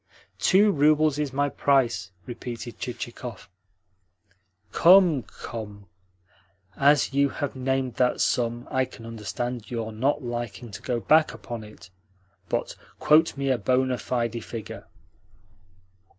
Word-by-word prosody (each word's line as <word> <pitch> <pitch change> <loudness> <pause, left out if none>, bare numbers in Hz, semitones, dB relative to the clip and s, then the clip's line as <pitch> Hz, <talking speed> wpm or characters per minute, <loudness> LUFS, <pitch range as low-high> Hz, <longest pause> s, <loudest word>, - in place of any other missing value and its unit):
"Two 205 +3 +5
roubles 150 -1 +3
is 145 -3 -1
my 145 +2 +1
price," 125 -9 +1 0.2
repeated 120 -1 -7
Chichikov. 120 -2 -6 1.2
"Come, 175 -5 +6
come! 105 -4 -9 0.9
As 145 0 +3
you 140 0 +3
have 145 +1 -4
named 130 -1 -1
that 125 -1 +2
sum, 120 0 0
I 130 0 +2
can 115 -2 -13
understand 115 +1 -5
your 115 -2 -4
not 135 +6 0
liking 120 -2 -5
to - - -8
go 120 -2 -2
back 155 +6 +3
upon 120 -3 -7
it; 105 -4 -14 0.6
but - - -2 0.2
quote 155 0 +4
me 135 -1 0
a 125 - +1
bona 130 +3 +1
fide 115 -2 -2
figure." 115 -4 -8
125 Hz, 120 wpm, -25 LUFS, 115-140 Hz, 1.2 s, Come